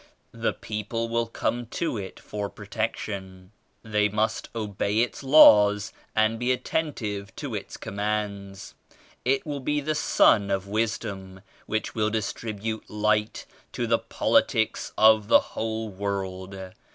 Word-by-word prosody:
The -, -, -1 dB
people 110 Hz, +2 st, -4 dB
will 115 Hz, 0 st, 0 dB
come 120 Hz, +1 st, -2 dB
to 165 Hz, +4 st, -2 dB
it 100 Hz, -3 st, -6 dB
for 105 Hz, -1 st, -5 dB
protection. 100 Hz, -3 st, -5 dB, 0.3 s
They 105 Hz, -1 st, +1 dB
must 110 Hz, +2 st, -1 dB
obey 105 Hz, 0 st, 0 dB
its 120 Hz, -, -2 dB
laws 105 Hz, -7 st, +7 dB, 0.2 s
and 110 Hz, +1 st, +2 dB
be 120 Hz, +1 st, +1 dB
attentive 120 Hz, -7 st, -2 dB
to -, -, -5 dB
its -, -, -5 dB
commands. 100 Hz, -1 st, -4 dB, 0.5 s
It 135 Hz, +2 st, +1 dB
will 145 Hz, -2 st, -3 dB
be 150 Hz, +3 st, 0 dB
the 155 Hz, +2 st, -1 dB
Sun 105 Hz, -8 st, +4 dB
of 95 Hz, -1 st, -1 dB
Wisdom 100 Hz, -3 st, -3 dB, 0.3 s
which 110 Hz, 0 st, -2 dB
will 110 Hz, -1 st, +1 dB
distribute 110 Hz, 0 st, -4 dB
Light 105 Hz, 0 st, 0 dB, 0.3 s
to -, -, -1 dB
the -, -, +2 dB
politics -, -, +1 dB
of 110 Hz, -1 st, +6 dB
the -, -, +7 dB
whole 110 Hz, 0 st, -3 dB
world. 95 Hz, -1 st, -4 dB
105 Hz, 130 wpm, -26 LUFS, 100-115 Hz, 0.5 s, laws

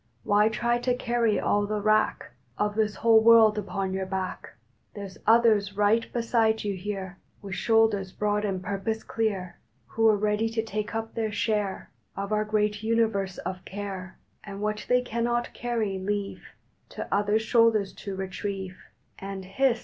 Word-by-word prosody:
Why 210 Hz, +1 st, +4 dB
try 240 Hz, +2 st, 0 dB
to 245 Hz, 0 st, 0 dB
carry 235 Hz, -3 st, +1 dB
all 205 Hz, 0 st, +1 dB
the 210 Hz, 0 st, -1 dB
wrack 215 Hz, +1 st, +1 dB, 0.3 s
Of 210 Hz, 0 st, 0 dB
this 215 Hz, -1 st, 0 dB
whole 225 Hz, +2 st, +5 dB
world 220 Hz, -2 st, +6 dB
upon 190 Hz, -1 st, -3 dB
your 190 Hz, 0 st, -2 dB
back? 190 Hz, -1 st, -5 dB, 0.4 s
There 205 Hz, -1 st, -5 dB
s 190 Hz, -, -12 dB
others 215 Hz, -3 st, +4 dB
right 210 Hz, +3 st, +2 dB
beside 230 Hz, -2 st, +1 dB
you 205 Hz, -1 st, -1 dB
here 190 Hz, -1 st, -5 dB, 0.2 s
With 195 Hz, -1 st, -6 dB
shoulders 215 Hz, -2 st, +2 dB
broad 210 Hz, +1 st, -1 dB
and 190 Hz, -3 st, -2 dB
purpose 205 Hz, +3 st, -3 dB
clear 200 Hz, -5 st, -2 dB, 0.3 s
Who 225 Hz, 0 st, +2 dB
re 215 Hz, -, +4 dB
ready 210 Hz, +2 st, 0 dB
to 225 Hz, 0 st, -1 dB
take 215 Hz, 0 st, -4 dB
up 225 Hz, 0 st, -3 dB
their 220 Hz, -2 st, -2 dB
share 205 Hz, -2 st, -2 dB, 0.3 s
Of 200 Hz, +1 st, -4 dB
our 215 Hz, 0 st, +1 dB
great 210 Hz, -1 st, 0 dB
Universe 220 Hz, -4 st, 0 dB
of 185 Hz, -1 st, -5 dB
care, 190 Hz, -1 st, -7 dB, 0.3 s
And 200 Hz, -1 st, -8 dB
what 210 Hz, 0 st, -3 dB
they 250 Hz, 0 st, +3 dB
cannot 240 Hz, 0 st, -1 dB
carry 225 Hz, -5 st, -2 dB
leave 200 Hz, +1 st, -3 dB, 0.5 s
To -, -, -6 dB
other 205 Hz, +1 st, +2 dB
shoulders 220 Hz, -3 st, +3 dB
to 200 Hz, -2 st, -7 dB
retrieve; 190 Hz, 0 st, -5 dB, 0.4 s
And 195 Hz, -1 st, -6 dB
hist! 235 Hz, +5 st, +1 dB
210 Hz, 165 wpm, -27 LUFS, 195-225 Hz, 0.5 s, world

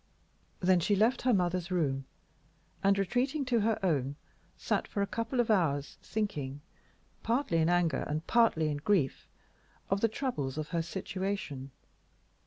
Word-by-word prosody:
Then 185 Hz, 0 st, +4 dB
she 205 Hz, +5 st, +2 dB
left 225 Hz, +6 st, +3 dB
her 255 Hz, -, +3 dB
mother's 180 Hz, -3 st, +1 dB
room, 140 Hz, -7 st, 0 dB, 0.8 s
and, 195 Hz, 0 st, +4 dB
retreating 255 Hz, -, 0 dB
to 245 Hz, -2 st, +2 dB
her 220 Hz, +1 st, +2 dB
own, 140 Hz, -5 st, +1 dB, 0.4 s
sat -, -, -1 dB
for 200 Hz, -, -1 dB
a -, -, +1 dB
couple 230 Hz, +4 st, -3 dB
of 235 Hz, -2 st, +3 dB
hours 145 Hz, -8 st, +1 dB
thinking, 150 Hz, -11 st, -3 dB, 0.6 s
partly 230 Hz, -7 st, +1 dB
in 160 Hz, +1 st, +3 dB
anger 175 Hz, -5 st, +2 dB
and 155 Hz, +2 st, -3 dB
partly 220 Hz, -10 st, +3 dB
in 145 Hz, -, -1 dB
grief, 155 Hz, -3 st, 0 dB, 0.6 s
of 195 Hz, 0 st, +2 dB
the 230 Hz, -, +5 dB
troubles 180 Hz, -, -3 dB
of 155 Hz, -1 st, -3 dB
her 170 Hz, -1 st, 0 dB
situation. 185 Hz, -5 st, -4 dB
185 Hz, 150 wpm, -31 LUFS, 155-220 Hz, 0.8 s, the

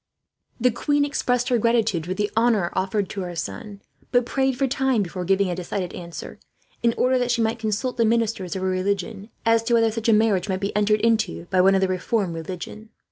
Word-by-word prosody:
The 250 Hz, +1 st, +3 dB
queen 290 Hz, +5 st, +1 dB
expressed 250 Hz, -3 st, 0 dB
her 245 Hz, -2 st, +2 dB
gratitude 225 Hz, -7 st, +1 dB
for 185 Hz, -, -2 dB
the 205 Hz, +1 st, -1 dB
honour 225 Hz, -6 st, +2 dB
offered 195 Hz, +1 st, -1 dB
to 195 Hz, -, -4 dB
her 175 Hz, -1 st, -5 dB
son, 170 Hz, -, -6 dB, 0.3 s
but 245 Hz, -1 st, +3 dB
prayed 265 Hz, 0 st, 0 dB
for 275 Hz, -, +2 dB
time 265 Hz, -4 st, +1 dB
before 180 Hz, 0 st, -5 dB
giving 195 Hz, 0 st, +2 dB
a -, -, -1 dB
decided 180 Hz, +1 st, -4 dB
answer, 170 Hz, -1 st, -8 dB, 0.4 s
in 235 Hz, -1 st, +2 dB
order 255 Hz, 0 st, +2 dB
that 245 Hz, 0 st, 0 dB
she 235 Hz, -1 st, +2 dB
might 225 Hz, +1 st, -1 dB
consult 225 Hz, +4 st, -2 dB
the 230 Hz, -, +3 dB
ministers 220 Hz, -5 st, 0 dB
of 190 Hz, -, -3 dB
her -, -, +1 dB
religion 195 Hz, +3 st, -2 dB, 0.2 s
as 230 Hz, 0 st, +4 dB
to 235 Hz, 0 st, +3 dB
whether 225 Hz, -1 st, +3 dB
such 230 Hz, +1 st, -2 dB
a -, -, +6 dB
marriage 210 Hz, -3 st, +2 dB
might 185 Hz, 0 st, -1 dB
be 200 Hz, 0 st, -3 dB
entered 210 Hz, 0 st, +2 dB
into, 215 Hz, -, +1 dB
by 185 Hz, -, +4 dB
one 195 Hz, +1 st, +5 dB
of 190 Hz, -, +2 dB
the 190 Hz, -, +3 dB
Reformed 185 Hz, 0 st, -1 dB
religion. 180 Hz, +6 st, -7 dB
210 Hz, 220 wpm, -23 LUFS, 185-235 Hz, 0.4 s, a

